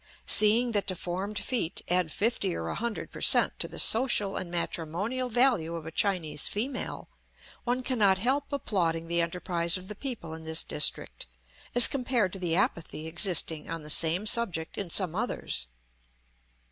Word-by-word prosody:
Seeing 225 +3 +4
that 205 -3 0
deformed 185 +2 -4
feet 230 -10 -3
add 180 -2 0
fifty 205 -4 -1
or 80 0 -5
a - - -3
hundred 235 -2 -5
per - - -10
cent, - - +4
to - - 0
the - - -11
social 220 -4 +3
and 180 - -4
matrimonial 175 +9 -3
value 235 -9 +1
of 165 -2 -8
a 160 - -7
Chinese 160 -6 +1
female, 250 +5 -4 0.6
one 250 +1 -1
cannot 210 -7 +2
help 265 +9 -1
applauding 170 - -2
the 170 0 0
enterprise 170 0 -1
of 185 0 -11
the - - -5
people 210 - -5
in 160 0 -8
this 160 0 +1
district 150 - -1 0.5
as 245 - +10
compared 245 -8 -1
to 195 - -6
the 170 -3 -2
apathy 160 -3 -2
existing 165 -2 +2
on 165 -1 -6
the 150 - -1
same 165 +6 +5
subject 195 -8 +1
in 195 -4 -5
some 180 -1 0
others. 195 - -4
185 Hz, 165 wpm, -27 LUFS, 165-230 Hz, 0.6 s, as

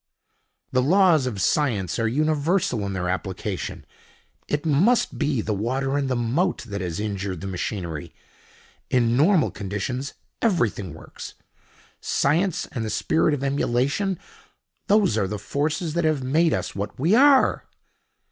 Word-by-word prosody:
"The 130 - +2
laws 165 -2 +4
of 110 -6 -4
science 105 - 0
are 115 - +1
universal 155 - +1
in 100 - -3
their 90 -2 -2
application. 95 +1 -4 0.6
It 145 +2 -2
must 180 - +2
be 145 -6 +1
the 105 - -2
water 130 +7 -1
in 140 -1 0
the 130 - 0
moat 130 +11 0
that 100 -4 -5
has 85 -1 -3
injured 100 -4 -3
the 100 - -7
machinery. 90 -4 -4 0.8
In 120 -2 +2
normal 160 +5 +4
conditions 105 +7 -4 0.3
everything 110 - 0
works. - - -10 0.6
Science 175 +5 +1
and 115 - -3
the 110 - -3
spirit 160 +5 +1
of 140 - -6
emulation—those 140 - -1
are 95 - 0
the 105 - -4
forces 150 - -2
that 170 +1 0
have 155 -4 +1
made 160 +6 +2
us - - -2
what 100 +4 -5
we 165 +9 +2
are." 270 +2 +5
130 Hz, 140 wpm, -24 LUFS, 105-160 Hz, 0.8 s, are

